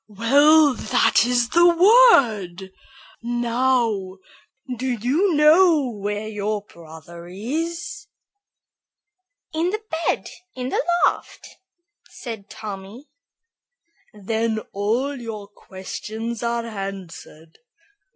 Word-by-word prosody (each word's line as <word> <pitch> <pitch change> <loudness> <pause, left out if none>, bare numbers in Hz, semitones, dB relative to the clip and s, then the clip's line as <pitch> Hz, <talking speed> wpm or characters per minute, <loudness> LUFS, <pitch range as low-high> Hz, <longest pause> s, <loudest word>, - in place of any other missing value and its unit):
'" - - -66
"Well, 285 +8 +4
that 220 - +2
is 240 -1 +1
the 345 +5 +3
word! 265 - +4 0.5
Now, 235 -4 -1 0.6
do 255 +2 -4
you 290 - 0
know 305 -2 +4
where 205 0 -4
your 210 -1 -3
brother 170 0 -13
is?" 330 - -5 1.5
"In 330 +3 0 0.4
bed - - -1 0.3
in 255 0 -4
the - - -1 0.2
loft," - - -3 0.6
said 220 -5 -9
Tommy. 210 +5 -9 1.0
"Then 220 +2 -2
all 230 +8 -1
your 215 -3 -7
questions 215 +4 -7
are 235 0 -2
answered. 195 -6 -9
230 Hz, 90 wpm, -22 LUFS, 200-280 Hz, 1.5 s, Well